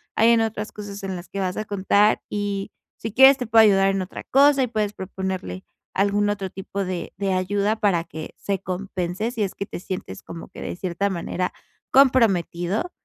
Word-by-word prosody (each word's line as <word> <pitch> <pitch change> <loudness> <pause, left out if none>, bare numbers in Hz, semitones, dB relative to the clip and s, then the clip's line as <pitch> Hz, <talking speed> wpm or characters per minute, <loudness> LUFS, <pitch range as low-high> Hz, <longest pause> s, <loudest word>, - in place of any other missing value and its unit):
hay 225 +1 +5
en 230 -1 +4
otras 220 -1 -3
cosas 205 -1 -7
en 190 -1 -3
las 175 -1 -9
que 200 - -5
vas 185 -1 -1
a 215 - -1
contar 205 +1 +3
y 205 -1 -2 0.3
si 225 -2 -5
quieres 265 +2 +8
te 250 -4 -4
puedo 225 0 +7
ayudar 195 -2 +5
en 195 0 -1
otra 185 - -7
cosa". 280 0 +5
Y - - 0
puedes 215 -3 -1
proponerle 190 - -5 0.3
algún 205 +1 +2
otro 195 -2 -2
tipo 195 +1 -5
de 180 -2 -4
de 195 -1 -1
ayuda 200 +3 0
para 195 -6 +2
que 160 -2 -8
se 195 -2 -2
compense 190 +2 -3
si 230 - -4
es 195 - -3
que 200 - -4
te - - -7
sientes 180 - -6
como 165 0 -9
que, - - -12
de - - -4
cierta 185 +2 -1
manera, 180 0 -2 0.4
comprometido. 220 - +3
200 Hz, 200 wpm, -23 LUFS, 185-215 Hz, 0.4 s, quieres